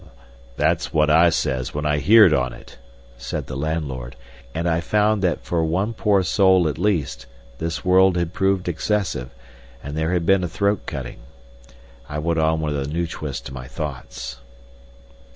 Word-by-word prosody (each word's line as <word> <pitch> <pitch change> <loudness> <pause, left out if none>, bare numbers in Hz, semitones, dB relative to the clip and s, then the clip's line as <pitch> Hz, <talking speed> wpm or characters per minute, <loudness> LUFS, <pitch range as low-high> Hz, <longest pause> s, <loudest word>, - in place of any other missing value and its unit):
"That's - - +1
what 75 -1 +3
I 85 +2 +6
says 65 -6 -2
when 75 +1 -2
I 75 -1 +1
heerd 105 -1 +7
on 65 -4 0
it!" - - -14 0.4
said - - -4
the - - -7
landlord, 70 -5 -3 0.4
and 85 +5 -2
I 85 0 +1
found 105 +3 +1
that 90 -5 0
for 85 -2 0
one 95 +8 0
poor 105 -3 +2
soul 95 -1 +4
at 75 - -3
least 75 -11 -1 0.3
this 80 -3 -4
world 95 0 +5
had 85 0 -2
proved 95 -1 0
excessive, 90 - -1 0.5
and 70 +1 -6
there 80 +2 0
had 85 -2 0
been 95 +1 +3
a - - 0
throat 100 +4 -1
cutting. 65 -6 -6 0.9
I 75 - -4
went 80 +2 0
on 80 0 +1
with 75 -1 -2
a 70 -1 -3
new 85 +4 -1
twist 75 -3 -6
to 65 - -8
my 65 -1 -8
thoughts. 65 -4 -6
80 Hz, 170 wpm, -22 LUFS, 70-95 Hz, 0.9 s, heerd